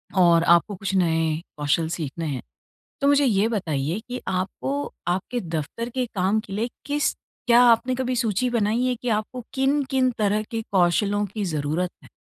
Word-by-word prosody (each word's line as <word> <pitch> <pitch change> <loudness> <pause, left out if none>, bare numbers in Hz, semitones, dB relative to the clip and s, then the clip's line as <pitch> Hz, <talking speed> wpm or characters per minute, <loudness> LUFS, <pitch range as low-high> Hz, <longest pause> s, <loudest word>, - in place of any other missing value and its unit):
और 170 -3 +5
आपको 170 +5 +4
कुछ 195 +1 -4
नए 165 -3 +1 0.2
कौशल 150 +2 +1
सीखने 160 +1 -4
हैं। 135 -5 -3 0.6
तो 280 - +3
मुझे 285 0 +5
ये 215 -3 +3
बताइए 165 -5 -1
कि 250 0 -5
आपको 265 +10 -2 0.2
आपके 190 +7 -1
दफ़्तर 170 +6 -4
के 250 +1 -1
काम 195 +3 +2
के 210 -3 -8
लिए 225 +4 -1 0.2
किस 295 +1 0 0.3
क्या 240 +1 +7
आपने 245 +2 +4
कभी 255 0 -1
सूची 235 0 +1
बनाई 230 0 +1
है 255 - +1
कि 245 - -2
आपको 220 +3 -2
किन-किन 270 -1 +2
तरह 210 0 +1
के 225 -1 -2
कौशलों 200 +3 +2
की 205 +1 -5
ज़रूरत 155 +2 -1
है? - - -16
205 Hz, 170 wpm, -24 LUFS, 175-245 Hz, 0.6 s, क्या